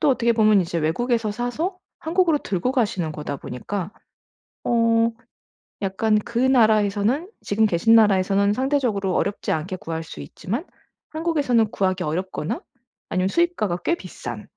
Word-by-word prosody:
또 - - +3
어떻게 235 -2 +2
보면 215 -3 +4
이제 170 -1 -2
외국에서 225 +8 0
사서 245 - -3 0.2
한국으로 330 -1 +2
들고 200 +1 -2
가시는 200 - 0
거다 150 -1 -5
보니까 185 - -5 0.7
어 230 -1 +3 0.7
약간 215 +3 +1
그 235 +2 -4
나라에서는 225 - +3
지금 220 +2 +2
계신 210 +5 +3
나라에서는 200 -1 +4
상대적으로 250 -8 0
어렵지 200 - -1
않게 175 +4 -2
구할 165 -2 -5
수 75 - -10
있지만 215 - -5 0.5
한국에서는 290 -9 +1
구하기 185 -1 0
어렵거나 165 0 -3 0.5
아니면 185 0 0
수입가가 220 - 0
꽤 340 - +2
비싼 - - -7
215 Hz, 345 characters per minute, -23 LUFS, 185-245 Hz, 0.7 s, 보면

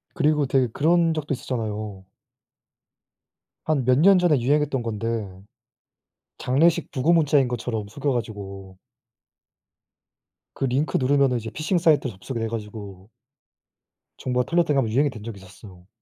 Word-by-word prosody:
그리고 150 -2 +2
되게 130 -1 +2
그런 165 +2 +2
적도 150 -2 -3
있었잖아요. 110 -6 -5 1.6
한 145 -5 0
몇 125 0 +4
년 195 +2 +6
전에 165 -7 +3
유행했던 140 0 +1
건데 115 0 -3 1.1
장례식 160 +7 +2
부고 150 +4 +1
문자인 145 -5 +3
것처럼 110 -3 -3
속여 140 +5 -2
가지고 100 -5 -6 1.8
그 - - -3
링크 135 +5 0
누르면 135 -1 +2
이제 115 0 -6
피싱 160 +4 -1
사이트로 155 - +2
접속이 110 +6 -7
되 115 - -1
가지고 105 -3 -7 1.1
정보가 125 -1 -1
틀렸다고 165 -4 +2
1 135 - +3
번 110 - -4
유행이 140 +4 +2
된 110 -4 -10
적이 110 -2 -7
있었어요. 95 -1 -15
125 Hz, 300 characters per minute, -24 LUFS, 110-150 Hz, 1.8 s, 년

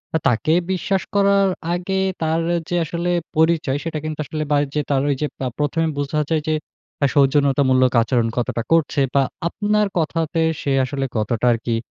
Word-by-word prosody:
আ - - +5
তাকে 130 +6 +2 0.2
বিশ্বাস 190 +1 0
করার 200 -1 +4 0.2
আগে 190 +2 -1 0.2
তার 160 +1 +1 0.3
যে 175 - -1
আসলে 170 +2 -2 0.3
পরিচয় 160 -3 +2
সেটা 160 -2 -3
কিন্তু 155 -1 -4
আসলে 155 +1 -3
বা 145 - +4
ওই - - 0
যে 150 - +2
তার 135 - +2
ওই 140 - +2
যে 150 - +1 0.2
আ - - 0
প্রথমে 160 +3 0
বুঝা 145 +2 -1
যায় 160 -2 +1
যে 155 - +2 0.5
আ - - +6
সৌজন্যতামূলক 135 -2 +3
আচরণ 115 0 +1
কতটা 120 -1 -1
করছে 160 -3 +2
বা 140 - +5 0.2
আপনার 210 +2 +1
কথাতে 165 0 -1 0.2
সে 140 - -1
আসলে 135 0 -3
কতটা 110 +2 -1
আর - - -1
কি 115 - 0
155 Hz, 180 wpm, -21 LUFS, 135-170 Hz, 0.5 s, আ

